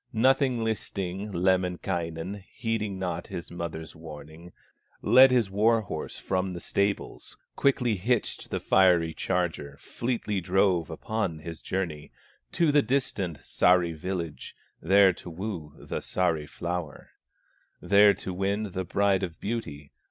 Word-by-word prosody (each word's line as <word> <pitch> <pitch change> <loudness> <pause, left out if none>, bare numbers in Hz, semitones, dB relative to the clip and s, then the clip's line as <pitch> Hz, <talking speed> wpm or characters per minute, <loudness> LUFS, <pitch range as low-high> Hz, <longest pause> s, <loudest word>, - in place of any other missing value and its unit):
Nothing 130 +1 +3
listing, 100 -2 -3
Lemminkainen, 90 0 -1
Heeding 110 -4 -2
not 95 -1 -3
his 85 - -6
mother's 80 -2 -6
warning, 80 +1 -11 0.5
Led 130 +1 +8
his 120 -6 +2
war 110 +3 +3
horse 80 -7 -6
from 95 0 -1
the 85 - -5
stables, 100 +3 -2 0.2
Quickly 125 -6 +2
hitched 115 +5 -1
the - - -2
fiery 90 -4 +4
charger, 80 -5 -2
Fleetly 115 -5 -2
drove 90 -1 +2
upon 85 +1 -2
his 80 +1 -8
journey, 85 -6 -3 0.4
To 170 -3 +3
the 145 0 +5
distant 105 - -1
Sahri 90 -2 +3
village, 85 -1 -5 0.3
There 95 +2 +5
to 90 - -10
woo 85 -4 -6
the - - -5
Sahri 80 -5 -1
flower, 85 -4 -5 0.7
There 100 +3 +5
to 95 - -6
win 100 +2 -1
the 95 +1 -3
Bride 100 +1 +2
of 85 -4 -5
Beauty. 80 -10 -5
95 Hz, 130 wpm, -27 LUFS, 85-105 Hz, 0.7 s, Led